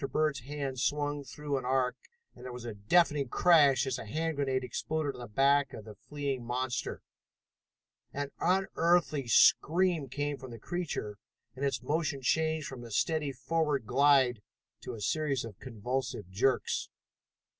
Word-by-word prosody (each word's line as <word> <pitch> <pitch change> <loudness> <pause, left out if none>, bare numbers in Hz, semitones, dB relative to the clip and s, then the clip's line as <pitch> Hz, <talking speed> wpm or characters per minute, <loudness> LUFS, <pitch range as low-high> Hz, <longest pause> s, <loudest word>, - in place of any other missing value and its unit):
Bird's 155 -3 +1
hand 135 0 -5
swung 145 +1 0
through 145 0 -3
an - - -9
arc, 130 0 +1 0.4
and - - -14
there 125 - -6
was 120 -1 -8
a 115 - -4
deafening 140 - +2
crash 145 -2 +5
as 130 -2 -2
a - - -7
hand 160 +7 -2
grenade 135 -2 0
exploded 150 +3 -2
on - - -10
the 120 - -7
back 135 +5 +3
of 105 - -8
the 110 - -9
fleeing 140 +2 -4
monster. 125 +1 -3 1.1
An 140 0 -4
unearthly 170 -6 +2
scream 165 - +4
came 145 +2 -2
from 130 -1 -10
the 115 - -8
creature, 115 - -4 0.4
and 135 - -6
its 135 -3 -1
motion 145 -1 -1
changed 160 +2 +1
from 130 -3 -7
a 120 - -9
steady 150 +5 0
forward 145 0 -1
glide 130 -2 +4 0.4
to 125 - -6
a 110 - -9
series 140 +1 0
of 105 -4 -10
convulsive 125 -2 -4
jerks. 125 +7 0
140 Hz, 155 wpm, -31 LUFS, 125-150 Hz, 1.1 s, crash